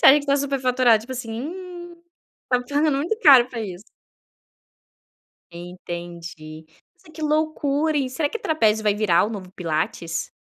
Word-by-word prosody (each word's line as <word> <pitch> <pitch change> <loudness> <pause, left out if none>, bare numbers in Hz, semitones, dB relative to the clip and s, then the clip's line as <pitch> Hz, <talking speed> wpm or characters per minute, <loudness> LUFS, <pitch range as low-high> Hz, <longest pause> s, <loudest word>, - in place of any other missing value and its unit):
Sabe 290 +2 +7
que, 285 - -11
tá 280 0 +3
superfaturado, 255 -4 +2
tipo 245 +4 -8
assim: 240 -3 -6
"Hum, 345 +2 -8 0.5
pagando 285 +5 +1
muito 345 +10 -1
caro 265 - +7
pra 235 -3 -6
isso". 190 -3 -7 1.7
Entendi. 170 -2 -9 0.3
Nossa, 320 - -20
que 315 - -9
loucura, 305 0 0
e 270 -2 0
será 285 +3 -1
que 460 - -5
trapézio 220 - +1
vai 210 -1 +2
virar 200 -5 +3
o 215 - -3
novo 195 -4 -7
pilates? 165 -1 -3
255 Hz, 145 wpm, -23 LUFS, 185-300 Hz, 1.7 s, Sabe